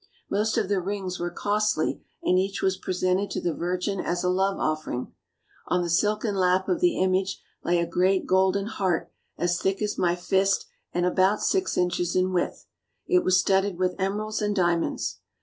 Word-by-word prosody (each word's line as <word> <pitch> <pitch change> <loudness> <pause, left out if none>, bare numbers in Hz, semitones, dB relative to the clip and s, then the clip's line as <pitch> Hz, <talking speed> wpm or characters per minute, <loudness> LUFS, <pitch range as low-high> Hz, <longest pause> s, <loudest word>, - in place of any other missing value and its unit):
Most 215 +3 +1
of 215 -4 +1
the 200 -2 +1
rings 190 -1 -4
were 175 0 -1
costly 210 -3 0 0.2
and 180 - +3
each 195 +1 -2
was 190 0 +2
presented 185 +1 -1
to - - -2
the 170 - -1
Virgin 180 +3 -2
as 175 0 -1
a 180 - +2
love 195 +1 +1
offering. 155 -5 -2 0.5
On 180 0 +1
the 170 - -2
silken 210 +4 +1
lap 185 0 +2
of 350 - +1
the 355 -2 +2
image 190 +1 +1 0.2
lay 175 0 +2
a 170 - +1
great 185 +3 +1
golden 190 +1 +2
heart 190 -5 -1 0.3
as 175 0 0
thick 195 0 0
as 210 -1 -2
my 175 -1 +2
fist 190 +2 +1 0.3
and 175 0 0
about 190 +3 +2
six 380 -1 +1
inches 175 -1 0
in 185 0 +2
width. 175 - -1 0.4
It 365 -1 +3
was 185 0 +4
studded 190 0 +1
with 185 0 +1
emeralds 210 +3 -1
and 210 -1 0
diamonds. 175 -3 0
185 Hz, 185 wpm, -26 LUFS, 180-200 Hz, 0.5 s, was